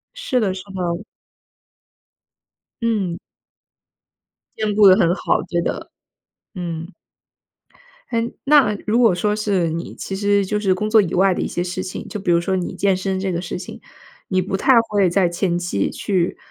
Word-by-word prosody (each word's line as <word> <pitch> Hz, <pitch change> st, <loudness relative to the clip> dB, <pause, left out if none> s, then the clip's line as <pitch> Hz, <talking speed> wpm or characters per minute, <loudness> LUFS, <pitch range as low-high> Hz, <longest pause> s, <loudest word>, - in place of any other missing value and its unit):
是 415 Hz, -, -1 dB
的 200 Hz, -5 st, 0 dB
是 185 Hz, -, -7 dB
的。 180 Hz, +1 st, -3 dB, 1.8 s
嗯。 200 Hz, -7 st, 0 dB, 1.4 s
兼 215 Hz, -1 st, -1 dB
顾 210 Hz, -1 st, +7 dB
得 185 Hz, -, +8 dB
很 170 Hz, -, +3 dB
好， -, -, 0 dB
觉 170 Hz, -1 st, -1 dB
得， -, -, -4 dB, 0.6 s
嗯。 170 Hz, 0 st, -5 dB, 1.2 s
诶， 230 Hz, 0 st, -1 dB
那 275 Hz, -7 st, +4 dB
如 225 Hz, +3 st, +2 dB
果 225 Hz, -7 st, +5 dB
说 210 Hz, +4 st, 0 dB
是 195 Hz, -6 st, 0 dB
你 165 Hz, +2 st, -5 dB
其 195 Hz, -, -5 dB
实 200 Hz, 0 st, +2 dB
就 210 Hz, +2 st, -1 dB
是 190 Hz, -3 st, +2 dB
工 210 Hz, +3 st, -2 dB
作 220 Hz, 0 st, +6 dB
以 180 Hz, -4 st, -3 dB
外 190 Hz, +1 st, +4 dB
的 -, -, -3 dB
一 -, -, -1 dB
些 175 Hz, -, -2 dB
事 180 Hz, +1 st, -4 dB
情， 185 Hz, -, -6 dB
就 210 Hz, -, -5 dB
比 185 Hz, -3 st, 0 dB
如 170 Hz, -, +4 dB
说 190 Hz, +2 st, -1 dB
你 180 Hz, -, -3 dB
健 195 Hz, -2 st, +2 dB
身 190 Hz, 0 st, -2 dB
这 190 Hz, -1 st, -2 dB
个 170 Hz, 0 st, -2 dB
事 180 Hz, -, -5 dB
情， 180 Hz, -, -9 dB, 0.5 s
你 185 Hz, -1 st, +1 dB
不 195 Hz, +1 st, -3 dB
太 260 Hz, +7 st, +3 dB, 0.2 s
会 200 Hz, -3 st, +3 dB
在 185 Hz, 0 st, +2 dB
前 175 Hz, 0 st, -1 dB
期 175 Hz, -, -1 dB
去 185 Hz, -3 st, -1 dB
190 Hz, 190 characters per minute, -20 LUFS, 175-210 Hz, 1.8 s, 得